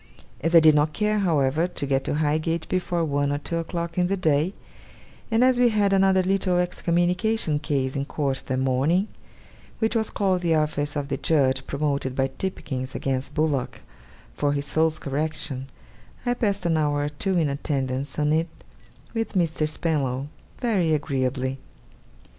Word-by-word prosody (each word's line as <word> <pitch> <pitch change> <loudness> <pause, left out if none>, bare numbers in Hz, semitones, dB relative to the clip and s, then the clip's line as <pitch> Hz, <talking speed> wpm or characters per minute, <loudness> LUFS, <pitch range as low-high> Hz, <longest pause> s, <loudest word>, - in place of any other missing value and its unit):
As 165 +4 0
I - - +11
did 155 -1 +6
not 150 +1 +2
care, 210 0 +1
however, 160 -3 +2
to 175 - -4
get 135 -1 +1
to - - -1
Highgate 155 +2 0
before 175 -2 0
one 145 -1 0
or 145 - 0
two 165 +3 -3
o'clock 170 +1 -3
in 180 - +3
the 195 +2 0
day, 160 +1 +1 0.7
and 225 +1 +3
as 255 -1 +4
we 245 -1 +5
had 205 -3 +2
another 190 -1 +4
little 185 -1 +1
excommunication 180 0 +1
case 140 -3 -1
in 140 0 -1
court 140 -2 -2
that 130 - -1
morning, 135 +10 +1 0.7
which 225 +1 0
was 220 -1 +1
called 190 -3 0
The 165 -2 +2
office 150 -1 -1
of 145 -1 -3
the - - -1
judge 130 -4 +1
promoted 140 -2 -1
by 135 0 +1
Tipkins 130 -9 -4
against 135 +1 -2
Bullock 150 -4 -1 0.5
for 145 - 0
his 140 0 -2
soul's 160 +1 +1
correction, 145 -2 -2 0.6
I 245 - +2
passed 205 -6 -1
an 165 -2 +2
hour 145 -1 +1
or 145 - -1
two 185 +6 -1
in 160 -3 +2
attendance 140 -1 -2
on 150 0 +2
it 165 +1 +1 0.7
with 225 -1 -2
Mr. 165 -4 +1
Spenlow 145 -4 -1 0.3
very 190 -10 +2
agreeably. 135 -2 -2
155 Hz, 165 wpm, -24 LUFS, 140-180 Hz, 0.7 s, I